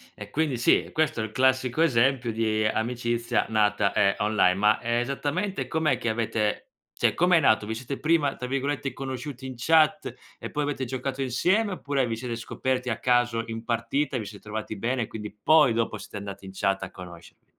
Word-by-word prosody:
e 100 - -9
quindi 150 +1 0
sì, 120 - +3
questo 155 -6 +1
è - - -1
il 110 - -9
classico 130 +2 +2
esempio 130 -4 +2
di 110 -1 0
amicizia 120 +1 0
nata, 105 -2 +2
ehm, 100 -2 +3
online, 105 -3 +3
ma 105 +2 +3
esattamente 140 - -1
com'è 155 -5 +1
che - - -4
avete 110 -2 -1 0.2
cioè - - +1
com'è 180 0 +4
nato? 110 -6 +3
Vi 110 - -3
siete 130 +4 -5
prima, 155 -3 +2
tra 125 - -5
virgolette, 140 +1 -2
"conosciuti 130 0 -6
in 130 -1 -6
chat" 160 +9 +3 0.3
e - - -6
poi 150 - -1
avete 145 -2 -2
giocato 130 +2 -4
insieme, 185 - +1
oppure 140 -6 -1
vi 115 - -2
siete 120 0 -5
scoperti 130 +2 -2
a 115 -1 -2
caso 120 -2 +2
in 115 0 -6
partita 130 +5 -1
e - - 0
vi 110 - -5
siete 100 0 -9
trovati 110 0 -6
bene 120 +2 -1
quindi 105 -2 -7
poi 150 +3 +4
dopo 115 -1 -1
siete 105 - -11
andati 100 -1 -8
in 95 - -8
chat 95 0 0
a 95 - -6
conoscervi? 90 -2 -12
120 Hz, 190 wpm, -26 LUFS, 110-140 Hz, 0.3 s, com'è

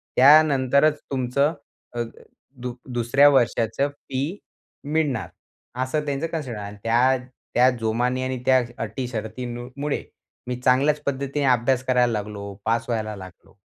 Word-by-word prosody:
त्यानंतरच 145 +1 +5
तुमचं 135 +4 +1 0.4
अ, 120 - -2 0.5
दु 125 -2 -6 0.2
दुसऱ्या 120 +4 +5
वर्षाचं 125 0 +2
फी 140 +5 -4 0.5
मिळणार. 145 -6 0 0.6
असं 150 +3 -2
त्यांचं 145 +3 -2
कन्सिडर 145 -9 -4
आहे 100 -1 -5
आणि 105 - -11
त्या 125 +3 +3 0.4
त्या 125 +1 +6
जोमानी 120 +3 0
आणि 130 0 -2
त्या 130 -1 +5 0.2
अटी 115 +4 -4
शर्ती 120 +1 -5 0.3
मुळे 145 0 -2 0.4
मी 125 - -2
चांगल्याच 135 +4 +3
पद्धतीने 140 +1 -1
अभ्यास 125 0 +2
करायला 125 -2 +3
लागलो. 100 -1 -5
पास 115 +1 +1
व्हायला 110 -2 -2
लागलो 95 -1 -13
130 Hz, 130 wpm, -24 LUFS, 115-140 Hz, 0.6 s, त्या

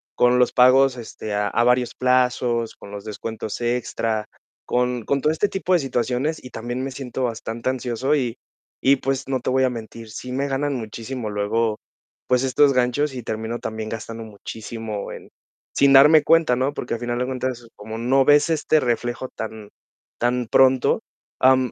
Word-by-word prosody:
con 125 0 +4
los 125 - +3
pagos, 130 +1 +5
este, 110 -2 -7
a 105 0 0
a 120 - +1
varios 125 0 +2
plazos, 125 -2 +1
con 100 - -13
los 100 -1 -7
descuentos 110 0 -5
extra, 115 -2 -1 0.4
con 125 -1 0
con 140 -1 0
todo 150 - +2
este 200 +6 0
tipo 190 -1 -1
de 180 - +5
situaciones 130 +3 -1
y 125 - -9
también 120 +3 -4
me 135 - -4
siento 130 -1 -5
bastante 115 +1 -3
ansioso 130 +2 -1
y 125 -5 -1 0.5
y 135 +1 +6
pues, 135 0 -2
no 130 -2 -1
te 130 - -1
voy 130 0 +3
a - - +2
mentir, 115 -1 -8
sí 125 +4 -7
me 135 +2 -1
ganan 140 +1 -1
muchísimo 115 0 -5
luego, 105 +2 0 0.5
pues 125 0 +2
estos 135 +2 +4
ganchos 130 +3 +1
y 125 - -5
termino 110 +1 -4
también 110 0 -5
gastando 115 +1 -6
muchísimo 110 0 -7
en - - -10 0.4
sin 140 -1 +4
darme 150 +3 +8
cuenta, 165 -5 +4
¿no? 130 +3 0
Porque 125 - -3
al - - -6
final 120 0 -2
de 125 - 0
cuentas, 130 -2 -4
como 110 +2 -7
no 130 +3 +3
ves 145 +2 +5
este 155 -1 +2
reflejo 120 0 -2
tan 110 -2 -7 0.5
tan 120 0 0
pronto, 130 -1 +4 0.4
am, 130 -2 +4
125 Hz, 180 wpm, -22 LUFS, 115-130 Hz, 0.5 s, darme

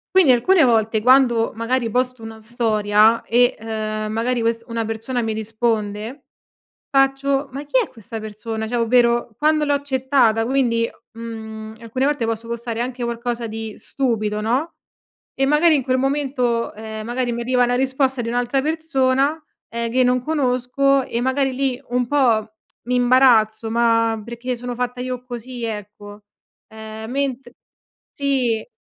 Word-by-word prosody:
Quindi 340 -9 +7
alcune 325 +9 +4
volte, 225 -3 +3
quando 240 -1 +4
magari 230 +2 -1
posto 250 0 -1
una 225 0 -8
storia 220 -1 +2
e, 245 +1 +3
uhm, 215 -1 -4
magari 235 +2 0
quest 230 0 0
una 230 -1 -2
persona 225 +3 -3
mi 220 -1 -1
risponde 220 +2 -2 0.7
faccio: 270 0 +1
"Ma 280 +3 -6
chi 395 - +1
è - - -4
questa 225 -1 -8
persona?" 220 +1 -5
Cioè 240 +2 -2
ovvero 235 -1 +2
"Quando 305 0 +2
l'ho 290 - +1
accettata?" 265 -5 +2
Quindi, 235 -3 +1 0.2
mhmm, 220 -1 -8
alcune 255 +4 -2
volte 290 -5 0
posso 225 0 -3
postare 235 -1 -4
anche 245 0 -3
qualcosa 235 0 -3
di 220 0 -6
stupido 215 -6 -2
no, 255 +10 -1 0.6
e 270 - 0
magari 305 +2 +4
in 270 - 0
quel 255 +1 +1
momento, 260 -4 0
ehm, 220 0 -7
magari 245 0 -1
mi 235 - -3
arriva 250 +1 +2
la 245 0 +1
risposta 265 0 0
di 230 - -3
un'altra 245 +3 0
persona, 300 -1 0 0.2
ehm, 235 0 -3
che 255 +2 +3
non 250 0 +2
conosco 275 -1 +1
e 235 +1 -2
magari 265 0 0
lì 265 -1 -1
un 245 0 0
po' 235 -6 +2 0.3
mi 250 +2 -1
imbarazzo, 235 -3 +4
ma 230 -1 +2
perché 240 +2 -5
sono 245 +1 -5
fatta 250 0 -3
io 250 0 -4
così 245 0 -7
ecco. 210 -1 -7 0.4
Ehm, 220 0 -8
mentre 270 -1 -3 0.6
sì. 255 -6 0
240 Hz, 150 wpm, -21 LUFS, 225-260 Hz, 0.7 s, Quindi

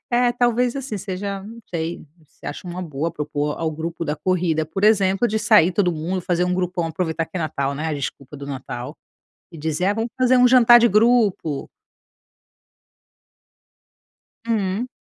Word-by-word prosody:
É, 245 0 +3
talvez, 245 +1 +1
assim, 270 -6 -4
seja 195 0 -4
não 225 +3 -10
sei, 165 -1 -4 0.2
se - - -16
acha 155 - -6
uma 175 +1 -5
boa 160 -1 -3
propor 150 -1 -3
ao 165 -1 -1
grupo 165 +2 -5
da 150 -2 -1
corrida, 165 -1 0
por 195 +6 -3
exemplo, 195 0 +3
de 220 -1 -2
sair 210 -5 +4
todo 180 -1 +2
mundo, 170 +4 -3
fazer 180 0 0
grupão, 180 -2 -1
aproveitar 165 0 -2
que 185 - -8
é - - -2
Natal, 140 -3 -2
né, 155 +3 -3
a 155 - -2
desculpa 140 0 -6
do 140 0 -8
Natal 125 -3 -6 0.6
e 165 - -11
dizer: 160 +3 -2
"Ah, 200 - +2
vamos 225 +1 -2
fazer 255 0 +3
jantar 240 -1 +7
de 235 - +5
grupo"? 210 - +2 2.8
Hum. 215 +1 -1
180 Hz, 165 wpm, -22 LUFS, 160-215 Hz, 2.8 s, jantar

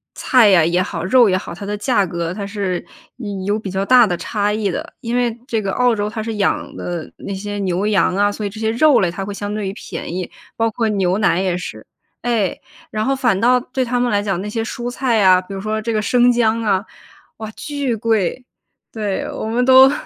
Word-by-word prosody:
菜 240 -5 +4
呀 185 -4 +5
也 175 +2 +2
好 170 -2 -4
肉 240 +4 +5
也 185 - +2
好， 180 - -7
它 185 +4 -8
的 205 +1 -2
价 210 -2 +1
格 170 -1 -3
它 200 0 -5
是 195 -4 -3 0.6
有 205 +2 0
比 205 - -6
较 190 +1 -2
大 250 -1 +6
的 180 - -1
差 205 +2 -1
异 210 -3 -1
的。 - - -5
因 235 -1 -3
为 240 -2 0
这 225 -2 -1
个 195 - -2
澳 250 -1 +3
洲 205 0 -2
它 220 0 -4
是 225 -1 -4
养 205 - -1
的 175 -2 -5
那 200 - -6
些 205 +1 -5
牛 190 0 -1
羊 200 -3 +2
啊， 205 +1 +2
所 210 +1 -5
以 200 - -1
这 215 - -10
些 220 0 0
肉 280 +4 +4
类 180 -3 +1
它 195 +2 -5
会 205 - -5
相 205 +1 -4
对 210 -2 -3
于 195 - -4
便 - - -7
宜， 180 0 -4 0.2
包 225 0 +1
括 225 +1 -1
牛 195 -2 +1
奶 195 -3 +2
也 185 -2 0
是。 110 -11 -7 0.4
哎， 230 -6 0 0.3
然 215 0 -1
后 270 - +1
反 245 -8 +1
倒 250 +3 +4
对 255 +1 -3
他 245 +1 -1
们 245 -2 +1
来 205 - +2
讲， 195 -3 -2
那 210 - -5
些 225 +1 -2
蔬 240 +1 -4
菜 245 -3 +1
啊， 185 -2 +6
比 185 +2 -9
如 195 - -5
说 215 +1 -2
这 230 +1 -2
个 215 - +1
生 245 +3 +4
姜 230 -1 +2
啊， 200 -1 +1 0.5
哇， 220 -1 -7
巨 285 0 -3
贵。 225 +1 0 0.5
对， 210 -4 -3
我 - - -5
们 230 +3 0
都 265 +1 +7
210 Hz, 255 characters per minute, -19 LUFS, 195-235 Hz, 0.6 s, 都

